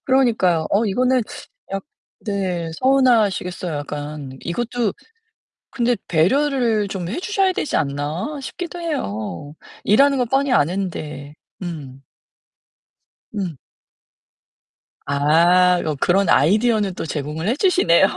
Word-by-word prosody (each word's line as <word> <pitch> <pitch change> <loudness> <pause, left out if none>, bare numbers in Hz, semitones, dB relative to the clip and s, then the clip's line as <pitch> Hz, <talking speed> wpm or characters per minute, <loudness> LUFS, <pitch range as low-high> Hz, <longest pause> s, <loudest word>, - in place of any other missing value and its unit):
그러니까요. 220 - +2
어 205 +3 +3
이거는 250 +4 +2 0.5
약 195 - -2 0.4
네. 185 -6 -2
서운하시겠어요 220 - +2
약간. 145 -2 -6
이것도 235 +4 -2 0.8
근데 240 -1 +1
'배려를 230 - +2
좀 185 -3 -4
해 235 - -3
주셔야 390 -1 +1
되지 330 - -2
않나?' 155 - -2
싶기도 350 +5 -6
해요. 145 - -4 0.3
일하는 275 +6 +4
거 250 - +2
뻔히 270 +2 +1
아는데. 155 - -1 0.3
음. 145 -7 -7 1.3
음. 180 -7 -3 1.5
아. 170 +6 +4
어 155 -2 -1
그런 195 +2 +2
아이디어는 210 - +3
또 - - -4
제공을 150 +2 -4
해 235 - +2
주시네요. 295 - +4
190 Hz, 235 characters per minute, -21 LUFS, 160-250 Hz, 1.5 s, 일하는